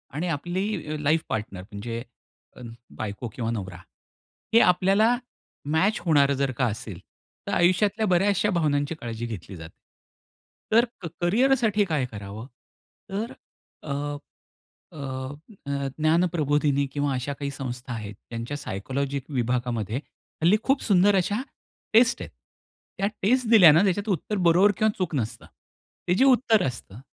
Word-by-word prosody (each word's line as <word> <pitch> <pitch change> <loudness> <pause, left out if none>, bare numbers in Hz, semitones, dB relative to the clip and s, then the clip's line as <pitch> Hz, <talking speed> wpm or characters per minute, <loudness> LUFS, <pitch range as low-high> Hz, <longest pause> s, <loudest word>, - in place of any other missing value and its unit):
आणि 165 +5 -2
आपली 175 +2 -2
अ, - - -3
life 155 +2 +2
partner 105 -4 -4
म्हणजे 115 +4 -6 0.9
बायको 110 +3 -4
किंवा 115 -2 -2
नवरा 95 -6 -5 0.8
हे 230 - +8
आपल्याला 195 +6 +4 0.6
मॅच 195 +7 +2
होणारं 140 -4 +4
जर 135 0 0
का 130 - +2
असेल, 105 -4 -5 0.5
तर - - -2
आयुष्यातल्या 200 +5 +2
बऱ्याचशा 195 +3 +2
भावनांची 150 -3 0
काळजी 115 -5 -5
घेतली 105 -4 -7
जाते. 80 0 -10 1.0
तर 230 +2 +5 0.4
करियरसाठी 220 +2 +3
काय 155 -7 0
करावं? 105 +1 -8 0.7
तर 215 +5 -3 0.5
अ, 150 - -6 1.1
अ, - - -6 0.6
अ, 140 -1 -2
ज्ञानप्रबोधिनी 155 -3 +2
किंवा 145 -1 0
अशा 130 +3 -3
काही 140 0 -4
संस्था 125 -2 -6
आहेत 105 -2 -6
ज्यांच्या 115 +6 -6
सायकोलॉजी 140 +3 -3
विभागामध्ये 120 -4 -1 0.5
हल्ली 175 +6 +5
खूप 270 0 +2
सुंदर 200 -1 +4
अशा 200 +4 0 0.5
टेस्ट 240 +3 +5
आहेत. - - -8 0.7
त्या 195 - +1 0.2
टेस्ट 245 +4 +2
दिल्यानं 175 -7 +8
ज्याच्यात 200 +2 0
उत्तर 200 +2 -1
बरोबर 185 +5 +5
किंवा 220 -1 +3
चूक 185 -4 -2
नसतं. 115 -3 -3 0.6
ते 180 - +4
जे 255 - +4
उत्तर 245 -5 +4
असतं 115 -3 -6
150 Hz, 130 wpm, -25 LUFS, 120-195 Hz, 1.1 s, हे